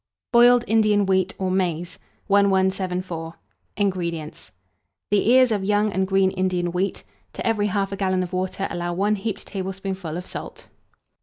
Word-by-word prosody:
BOILED 240 0 +6
INDIAN 215 -2 +3
WHEAT 190 0 +1
or 190 -1 -1
MAIZE. 175 -2 -2 0.3
1174. 190 -4 0 0.4
INGREDIENTS. 170 - -3 0.6
The 205 +1 +3
ears 255 -1 +6
of 205 -3 0
young 205 +1 +1
and 190 0 0
green 190 0 +3
Indian 185 -2 -1
wheat; 185 +2 -2 0.3
to - - -6
every 210 -2 +1
1/2 195 0 -2
gallon 185 -1 +1
of 180 0 -7
water 185 +1 -2
allow 175 0 -3
1 205 +3 +1
heaped 205 +1 -4
tablespoonful 190 -3 -5
of 180 - -6
salt. - - -9
190 Hz, 145 wpm, -23 LUFS, 185-205 Hz, 0.6 s, BOILED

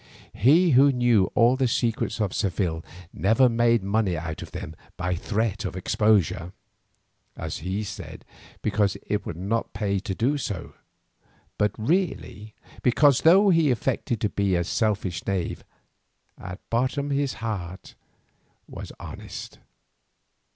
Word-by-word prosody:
He 160 - +4
who 140 +2 +6
knew 120 -6 +3
all 120 +2 +5
the 130 -1 +1
secrets 115 -1 -1
of 105 -4 0
Seville 90 -4 -1 0.3
never 110 +6 +4
made 115 -2 +2
money 100 -3 0
out 80 -1 -5
of - - -8
them 80 - -7 0.2
by 90 +1 -1
threat 105 +3 -1
of 95 - -4
exposure, 95 -3 +1 0.8
as 80 -1 -4
he 95 +5 -3
said 105 0 -8 0.4
because 105 -2 +1
it 105 0 -2
would 80 - -5
not 105 +6 -2
pay 100 -2 -1
to 95 0 -4
do 140 +8 +1
so, 100 -9 -5 0.9
but 105 - +3
really 115 - -2 0.3
because 135 +2 +4
though 195 +5 +6
he 165 -4 +4
affected 120 -1 -1
to 105 - +1
be 100 -2 0
a 85 - +1
selfish 95 -3 -1
knave, 95 -3 -2 0.7
at 90 +2 -8
bottom 130 +4 0
his 140 -1 0
heart 95 -6 -6 0.7
was - - -8
honest. - - -8
110 Hz, 135 wpm, -25 LUFS, 95-125 Hz, 0.9 s, who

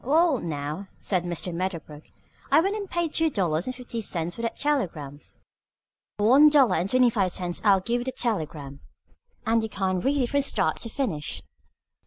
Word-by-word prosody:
"Well, 305 +1 +3
now," 155 +4 -4
said 180 -3 -1
Mr. 175 0 -3
Medderbrook, 165 -4 -5 0.4
"I - - +6
went 390 +5 +1
and 405 -3 -5
paid 345 -3 -1
two 325 0 +2
dollars 175 - -1
and 255 - -3
fifty 240 -2 -6
cents 175 -4 -3
for 230 - -7
that 230 - -2
telegram. 165 - -2 1.0
For 205 0 +2
one 285 +5 +8
dollar 270 -10 +4
and 185 - -1
twenty 250 0 +4
five 195 -4 +1
cents 175 -2 -3
I'll 195 -3 +5
give 235 +5 -1
you - - -6
the 260 - -2
telegram, 155 - -3 0.7
and 225 +1 +2
you 220 - -3
can 190 -2 -1
read 280 +8 +1
it 240 - -3
from 285 - +3
start 275 - 0
to 230 - -4
finish." 205 - -3
210 Hz, 190 wpm, -26 LUFS, 175-265 Hz, 1.0 s, one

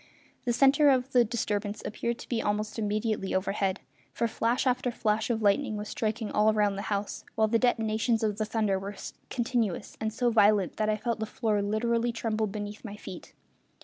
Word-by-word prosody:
The 245 - +2
centre 275 +4 +5
of 260 0 +2
the 245 -2 +5
disturbance 210 -2 -2
appeared 235 +2 -2
to - - -10
be 235 -2 -1
almost 210 +1 -2
immediately 210 -1 -1
overhead, 190 0 0 0.3
for 235 - 0
flash 230 +3 0
after 255 -1 +1
flash 220 -1 0
of 225 -2 0
lightning 215 +2 +2
was 210 0 -5
striking 220 -1 -2
all 215 +1 +4
round 205 -2 +2
the 195 - -3
house, 200 -1 -2
while 220 -1 +3
the 230 +1 +2
detonations 225 -1 +1
of 210 -1 0
the 215 - +1
thunder 215 -3 0
were 200 +1 -6 0.3
continuous 235 -6 -1
and 220 0 0
so 240 +2 +1
violent 205 -4 +4
that 215 0 +1
I 215 - +1
felt 230 +1 -2
the 220 - -2
floor 215 -2 0
literally 230 +3 0
tremble 220 -2 -1
beneath 205 +1 -6
my 205 -3 -7
feet. 185 -3 -10
220 Hz, 190 wpm, -28 LUFS, 210-235 Hz, 0.3 s, centre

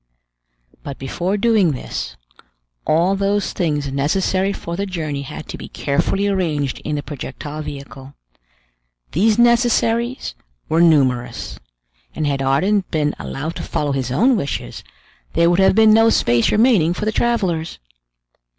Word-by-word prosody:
But 140 -1 -7
before 175 +9 -2
doing 205 -7 +3
this, 70 - -6 0.7
all 170 +5 +3
those 200 +1 0
things 150 -6 -1
necessary 185 +7 0
for 170 -3 -5
the 200 +3 -3
journey 155 -6 -3
had 140 - -8
to - - -7
be - - -8
carefully 195 +8 0
arranged 160 -9 -1
in 150 - -2
the 145 - -3
projectile 150 +1 -7
vehicle. 140 -1 -9 1.0
These 210 +6 +2
necessaries 235 0 +2 0.3
were 165 +1 +2
numerous; 135 -7 +1 0.6
and 155 - -1
had 140 -1 -1
Ardan 185 +10 +2
been 150 -2 0
allowed 155 +5 -5
to - - -5
follow 145 -1 -2
his 130 -2 -2
own 240 - +3
wishes, 165 -10 -4 0.5
there 170 +1 +3
would 175 - +2
have 190 0 +4
been 220 0 +6
no 225 +1 +5
space 120 - +2
remaining 210 -7 +3
for 210 - -3
the 215 - +1
travelers. 190 -9 -1
170 Hz, 140 wpm, -19 LUFS, 145-205 Hz, 1.0 s, been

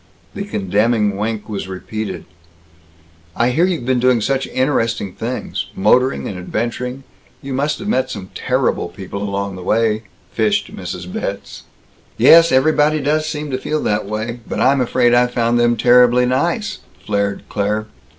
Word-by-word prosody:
The 200 - -5
condemning 105 - +1
wink 105 +1 -3
was 100 -3 -5
repeated. 105 +3 -5 1.1
"I 120 +1 +2
hear 165 +7 +3
you've 170 -10 -2
been 130 -1 +1
doing 125 -1 +3
such 135 +5 -1
interesting 115 -7 0
things 120 +3 -4
motoring 125 +7 +2
and 95 - -5
adventuring 120 +7 -3 0.4
you 135 0 -5
must 145 +3 0
have 200 - -7
met 130 -11 +1
some 95 -1 -7
terrible - - 0
people 95 +2 -7
along 100 -1 -3
the - - -8
way," 110 +3 +1 0.3
fished - - 0
Mrs. 90 -1 -6
Betz. 100 0 -5 0.5
"Yes, 165 0 +7
everybody 150 +3 +3
does 155 +2 0
seem 150 -1 -4
to 130 - -2
feel 155 +3 -2
that 105 -1 0
way. 110 +3 -4
But - - -3
I'm 135 +1 +3
afraid 120 0 +2
I 120 0 +5
found 120 -1 +1
them 120 0 +3
terribly 125 +1 +5
nice," 170 - -1 0.3
flared 100 -1 -1
Claire. 105 +1 -1
120 Hz, 155 wpm, -18 LUFS, 105-130 Hz, 1.1 s, Yes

